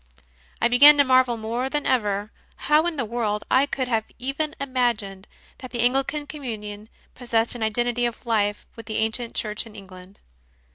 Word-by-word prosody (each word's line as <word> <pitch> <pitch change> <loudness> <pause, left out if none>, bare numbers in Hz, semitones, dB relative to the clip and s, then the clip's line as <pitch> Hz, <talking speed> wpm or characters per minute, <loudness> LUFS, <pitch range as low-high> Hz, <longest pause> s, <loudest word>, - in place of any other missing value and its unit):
I 235 - +3
began 285 +5 +8
to 285 - +6
marvel 255 -2 +3
more 230 +4 -3
than 295 +1 -2
ever 210 -4 0 0.2
how 305 +3 +2
in 345 - -2
the 260 -5 -2
world 215 -2 -2
I 270 +2 +4
could 265 -2 -3
have 225 -3 0
even 280 +5 -3
imagined 235 -8 -2 0.3
that 255 - -9
the 240 -2 -2
Anglican 270 +4 0
Communion 215 -7 -7 0.2
possessed 230 -2 0
an 240 - -7
identity 240 +2 0
of 235 - -8
life 210 -3 0
with 230 -1 -11
the 220 - -3
ancient 225 +2 -2
Church 215 +1 -2
in 215 - -15
England. 190 -1 -13
235 Hz, 175 wpm, -24 LUFS, 215-260 Hz, 0.3 s, began